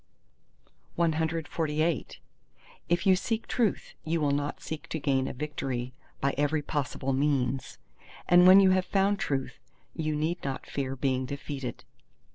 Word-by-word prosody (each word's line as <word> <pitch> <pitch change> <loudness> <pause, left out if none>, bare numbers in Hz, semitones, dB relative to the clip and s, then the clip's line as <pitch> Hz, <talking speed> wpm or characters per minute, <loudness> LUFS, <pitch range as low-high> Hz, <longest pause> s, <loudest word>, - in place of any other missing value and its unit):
CXLIX 160 -1 0 0.7
If 175 0 +1
you 190 -1 +6
seek 225 +4 -2
Truth, 230 -6 -1
you 165 +1 0
will 145 -2 +1
not 145 +1 -1
seek 160 -2 -7
to 160 - -3
gain 135 -2 +1
a - - -4
victory 130 -3 -4 0.3
by 140 0 +1
every 145 +1 +1
possible 135 -2 -2
means; 135 -2 0 0.5
and 180 +1 +7
when 190 +1 +10
you 190 -1 +6
have 185 0 +2
found 200 +1 +2
Truth, 135 -2 -2 0.3
you 155 -2 -2
need 160 +4 -1
not 135 -2 -4
fear 135 -1 -3
being 130 -1 0
defeated. 140 -2 -5
150 Hz, 140 wpm, -28 LUFS, 135-170 Hz, 0.7 s, when